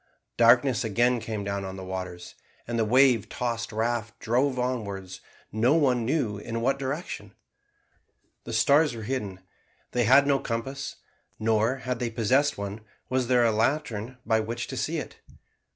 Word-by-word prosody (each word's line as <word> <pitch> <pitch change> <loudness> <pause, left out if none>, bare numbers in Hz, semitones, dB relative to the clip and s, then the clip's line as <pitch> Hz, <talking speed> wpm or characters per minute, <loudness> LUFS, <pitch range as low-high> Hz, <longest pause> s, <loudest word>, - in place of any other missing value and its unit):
Darkness 120 +1 +5
again 120 +3 +2
came 110 -2 -4
down 100 0 -3
on 95 0 -6
the 95 - -7
waters, 90 -1 -6 0.3
and 115 0 -2
the - - +3
wave 125 -2 +4
tossed 120 -3 -3
raft 115 0 -2
drove 130 +4 +1
onwards 100 -7 -3 0.3
no 115 +7 +3
one 130 -7 +2
knew 120 -8 0
in 115 +2 -4
what 135 +3 +1
direction. 140 +6 -5 1.1
The - - -7
stars 145 -2 +4
were 110 - -7
hidden 105 -6 -4 0.5
they 120 -1 +1
had 135 +4 +6
no 140 -1 +3
compass 135 +5 -4 0.4
nor, 110 +3 +2
had 125 -2 -4
they 120 - -1
possessed 130 +6 +2
one, 100 +2 -5 0.3
was 130 -1 0
there 125 -1 +4
a 115 - +4
lantern 120 0 -1
by 110 -1 +3
which 115 +2 -3
to - - -5
see - - -1
it. - - -6
120 Hz, 160 wpm, -27 LUFS, 110-130 Hz, 1.1 s, had